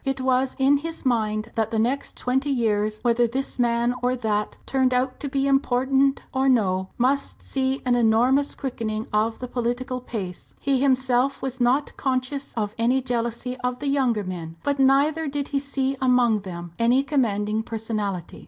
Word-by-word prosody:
It 270 -1 -2
was 260 0 +1
in 270 +2 +4
his 325 +1 -6
mind 220 -2 0
that 225 -2 0
the 225 - -2
next 245 +6 -1
twenty 265 +3 0
years, 215 -5 +1
whether 240 0 +3
this 265 +3 -4
man 235 0 +2
or 250 +1 +1
that 215 -4 -2
turned 260 -1 +1
out 255 +1 0
to 285 - -4
be 270 0 0
important 270 0 +2
or 265 0 +2
no, 190 -6 +2
must 270 +3 0
see 265 0 -1
an 250 - +3
enormous 245 +4 +3
quickening 225 -4 -3
of 220 +2 +1
the 250 - -6
political 250 +1 -2
pace. 195 -8 -7
He 270 -2 +1
himself 260 0 +2
was 260 -1 -3
not 260 +4 +2
conscious 265 +1 -2
of 210 -2 -2
any 245 +3 +3
jealousy 240 +1 -2
of 250 -1 -2
the 285 - -2
younger 255 -6 +1
men; 170 -3 -6
but 285 -1 0
neither 285 +4 +3
did 280 0 -3
he 280 - 0
see 275 -1 -1
among 250 -4 +3
them 175 -3 -7
any 245 +4 +4
commanding 220 -7 0
personality. 215 -6 -4
250 Hz, 170 wpm, -24 LUFS, 225-270 Hz, -, in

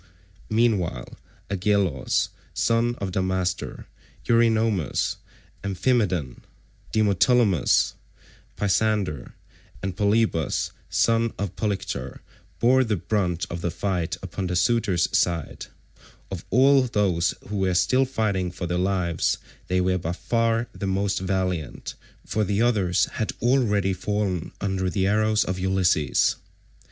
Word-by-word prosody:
Meanwhile 110 - +1 0.4
Agelaus 100 -7 +1 0.3
son 115 +1 +1
of 100 -4 -4
Damastor, 95 -1 -2 0.4
Eurynomus, 110 - +2 0.5
Amphimedon, 95 - 0 0.5
Demoptolemus, 105 - +3 0.6
Pisander, 100 - 0 0.5
and 95 -2 -3
Polybus 105 -5 +1 0.2
son 115 0 +2
of 100 -2 -4
Polyctor 95 - -3 0.4
bore 130 +2 +4
the 110 -3 0
brunt 90 -2 -1
of 85 - -4
the 85 - -1
fight 90 -2 -2
upon 95 +1 -4
the 90 - -2
suitors' 95 -4 +2
side; 85 -4 -1 0.6
of 95 -3 -6
all 135 +4 +5
those 100 -8 +1
who 105 - -3
were 95 -2 +1
still 115 +10 +3
fighting 105 -8 -1
for 90 +1 -6
their 90 +1 -1
lives 90 -3 0 0.3
they 90 0 +1
were 90 0 +1
by 85 0 -3
far 115 +3 0
the 100 - -4
most 95 +1 0
valiant, 90 -4 -2 0.3
for 110 - 0
the 100 0 0
others 105 -7 +2
had 110 - -3
already 105 -6 +2
fallen 95 -2 -2
under 95 -1 -1
the 95 0 0
arrows 110 +1 +2
of 90 0 -3
Ulysses. 90 -6 +2
95 Hz, 115 wpm, -24 LUFS, 90-110 Hz, 0.6 s, all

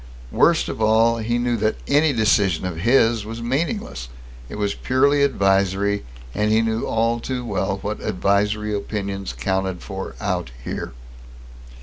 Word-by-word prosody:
Worst - - +3
of - - -5
all, 115 +2 +4
he 120 +2 0
knew 120 0 0
that 110 0 +1
any 145 +2 +4
decision 105 -7 +2
of 90 -3 -4
his 115 +2 +3
was 115 +2 -7
meaningless. 130 - -2 0.4
It - - -7
was 105 -1 -1
purely 140 +3 +2
advisory, 100 -5 +1 0.3
and 105 +1 +1
he 110 +1 +4
knew 110 0 -1
all 115 +1 +1
too 125 0 -4
well 100 -2 -1
what 105 +1 -3
"advisory" 105 +3 0
opinions 100 -1 -3
counted 95 -2 -2
for - - -6
out - - -2
here. - - -5
110 Hz, 145 wpm, -22 LUFS, 100-120 Hz, 0.4 s, all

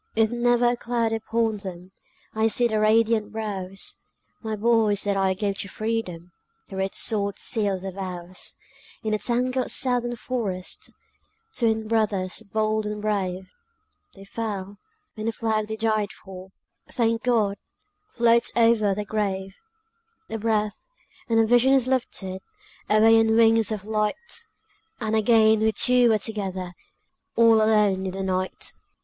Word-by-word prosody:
With 220 0 +3
never 240 0 +2
a - - -1
cloud 235 -1 -1
upon 225 0 -1
them, 185 -2 -8 0.4
I 220 +1 +2
see 240 +2 +3
their 215 -2 0
radiant 220 0 +2
brows; 195 -3 -2 0.4
My 220 -1 -3
boys 215 -2 +2
that 200 -1 0
I 190 -1 +1
gave 200 0 -2
to - - -3
freedom, 185 -7 -4 0.4
The 195 - -7
red 190 0 -2
sword 200 -3 0
sealed 205 -5 -1
their 190 - -4
vows! 185 -1 -5 0.5
In 215 -1 -1
a 215 - 0
tangled 250 +2 -1
Southern 245 -2 +1
forest, 215 -6 -4 0.7
Twin 220 -2 0
brothers 210 -4 0
bold 215 0 0
and 210 0 -4
brave, 190 -3 -2 0.6
They 195 0 -13
fell; 200 -2 -5 0.4
and 215 0 -4
the - - +1
flag 220 -1 -1
they 220 - -4
died 215 -2 0
for, 190 -1 -12 0.4
Thank 230 -1 +1
God! 215 -5 +1 0.5
floats 235 0 +3
over 225 -4 +3
their 210 +1 -4
grave. 195 -2 -2 0.8
A 225 - -3
breath, 215 -1 -1 0.5
and 225 - +2
the 225 - +5
vision 245 +4 +4
is 265 -3 +3
lifted 195 -7 -2 0.5
Away 225 +1 +6
on 220 0 +3
wings 225 -1 +4
of 205 -2 -4
light, 215 -1 0 0.8
And 220 -2 -1
again 220 0 +4
we 220 0 +2
two 245 +1 +3
are 220 - +4
together, 190 -4 -4 0.6
All 230 -1 +6
alone 210 -3 +2
in 185 - -4
the 195 0 -4
night. 185 0 -3
215 Hz, 145 wpm, -24 LUFS, 195-225 Hz, 0.8 s, Away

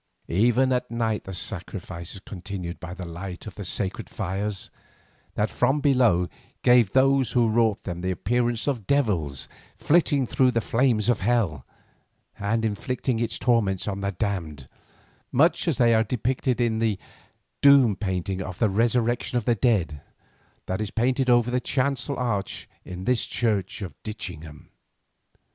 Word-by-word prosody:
Even 120 +8 +3
at 125 0 -1
night 115 -2 -1
the 95 - -6
sacrifices 90 0 -6
continued 90 -2 -6
by 90 0 -7
the 90 -1 -6
light 90 +2 -7
of 110 - -7
the 105 - -7
sacred 95 +1 -3
fires, 100 +1 -3 0.6
that 105 +1 0
from 130 +4 +2
below 125 - +3 0.4
gave 120 -5 +5
those 135 0 +3
who 120 -2 +4
wrought 110 -2 +2
them 90 -2 -5
the 95 - -1
appearance 120 +5 0
of 125 -9 -2
devils 90 - 0 0.3
flitting 145 -4 +2
through 130 +2 +3
the 115 - +1
flames 115 -1 +1
of 120 -3 +2
hell, 100 - 0 0.7
and 110 +3 0
inflicting 115 +3 -2
its 115 -1 -1
torments 110 -7 +1
on 100 -1 -3
the 100 0 -1
damned, 85 - -3 0.6
much 160 +7 +3
as 165 - +1
they 120 -2 +4
are 110 0 +4
depicted 125 +2 -1
in 115 -2 +1
the 110 -3 +1 0.6
"Doom" 140 -7 +6
painting 95 -1 -2
of 90 -1 -6
the 110 - +2
resurrection 120 +3 +1
of 120 - -2
the 120 - +3
dead 100 - +1 0.6
that 95 +2 -2
is 105 - -3 0.4
over 120 -1 +4
the 125 0 +1
chancel 135 +1 -1
arch 105 -6 -2 0.2
in 90 0 -7
this 125 +3 +1
church 105 -4 -1
of 95 - -6
Ditchingham. 80 -8 -7
110 Hz, 150 wpm, -25 LUFS, 95-125 Hz, 0.7 s, Doom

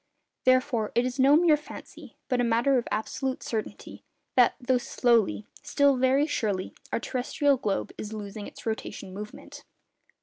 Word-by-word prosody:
Therefore, 255 -4 +2
it 240 - +3
is 255 +2 -4
no 275 +3 +6
mere 330 -2 +5
fancy, 300 - -11
but 250 -2 +1
a - - +1
matter 240 +3 +3
of 235 - -6
absolute 260 +5 -3
certainty, 220 -2 -5 0.3
that, 250 -2 +5
though 250 -1 +1
slowly, 230 - +1 0.2
still 285 -1 +3
very 260 +3 +3
surely, 205 -10 -2 0.2
our - - 0
terrestrial 265 +3 0
globe 205 -5 -2
is 210 - -5
losing 210 -1 -6
its - - -13
rotation 220 -3 -5
movement. 210 +2 -9
245 Hz, 155 wpm, -27 LUFS, 215-265 Hz, 0.3 s, no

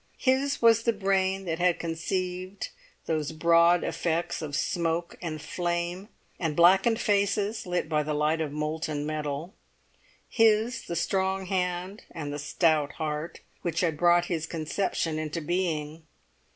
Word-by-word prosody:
His 270 0 +1
was 230 -1 +6
the 230 0 +2
brain 195 -1 0
that 165 -1 -2
had 180 -1 +3
conceived 185 +3 -3 0.4
those 155 -2 -1
broad 170 +2 +4
effects 170 +1 -1
of 145 -3 -4
smoke 170 +1 -1
and 160 -3 -4
flame, 175 +4 -3 0.3
and 160 -4 -1
blackened 190 +7 +5
faces 205 0 +1
lit 180 -2 -1
by 155 -1 +1
the 150 0 -2
light 155 +2 +1
of 155 -3 -2
molten 150 0 -2
metal; 150 +2 -3 0.7
his 225 +1 +3
the 170 - -3
strong 190 +3 0
hand 180 +1 -2
and 145 -3 -5
the 145 - -4
stout 150 -1 +1
heart 155 +1 -4 0.2
which 170 -2 -1
had 165 -4 +1
brought 175 +2 +4
his 165 -2 -2
conception 165 0 -2
into 155 +1 -3
being. 160 -2 -2
170 Hz, 140 wpm, -27 LUFS, 155-190 Hz, 0.7 s, was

